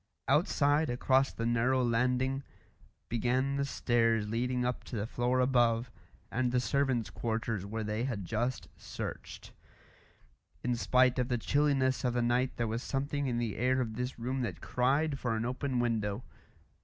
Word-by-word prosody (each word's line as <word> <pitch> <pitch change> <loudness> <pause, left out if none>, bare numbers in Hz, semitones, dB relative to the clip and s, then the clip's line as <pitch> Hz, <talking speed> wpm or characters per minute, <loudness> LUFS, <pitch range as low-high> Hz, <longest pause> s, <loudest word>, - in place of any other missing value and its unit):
Outside, 145 +2 +3
across 130 +2 +2
the 115 - -4
narrow 120 +2 +2
landing, 125 +3 +1 0.7
began 125 +4 0
the 140 - 0
stairs 115 -5 +1
leading 125 +3 -1
up 125 0 -2
to - - -7
the 105 -1 -1
floor 120 +2 0
above, 120 -2 +2 0.4
and 125 0 0
the 125 - +2
servants' 125 -6 0
quarters 110 -2 -2
where 110 +1 -3
they 105 +3 -2
had 110 -8 -3
just 120 +6 -2
searched. - - -7 1.1
In 125 0 +1
spite 125 +2 +3
of 125 - +1
the 125 -1 0
chilliness 135 0 +1
of 125 -1 0
the 120 - +2
night 125 +2 +1
there 120 - 0
was 115 +2 -2
something 140 +1 -2
in 120 -2 -1
the 115 -3 -2
air 130 +2 +2
of 115 -3 -2
this 125 +2 -3
room 130 +3 -2
that 95 -9 -3
cried 135 - +1
for 120 -3 -1
an 110 +1 -1
open 130 +1 -2
window. 110 -2 -1
125 Hz, 165 wpm, -31 LUFS, 115-130 Hz, 1.1 s, Outside